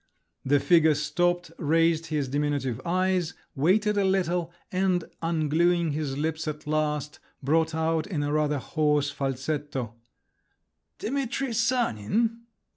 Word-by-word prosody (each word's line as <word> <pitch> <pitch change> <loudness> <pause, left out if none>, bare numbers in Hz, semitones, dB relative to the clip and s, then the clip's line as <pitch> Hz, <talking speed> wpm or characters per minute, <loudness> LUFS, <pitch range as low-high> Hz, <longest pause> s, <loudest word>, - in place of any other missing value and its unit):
The 145 +2 +3
figure 160 -1 +4
stopped, 175 +4 0
raised 165 +1 +2
his 150 -3 -1
diminutive 140 -3 -1
eyes, 185 -1 0 0.2
waited 200 +8 +2
a - - +2
little, 180 -3 +1 0.2
and 185 -2 +1 0.2
ungluing 165 +1 +2
his 145 -2 -3
lips 160 +1 -2
at 150 0 -5
last, 150 -1 -1 0.2
brought 160 +3 +2
out 160 0 0
in 160 -8 -2
a 145 0 -1
rather 150 -1 +1
hoarse 150 0 +1
falsetto, 135 -2 -3 1.0
"Dimitri 270 0 -2
Sanin?" 230 - +1
160 Hz, 120 wpm, -27 LUFS, 145-180 Hz, 1.0 s, figure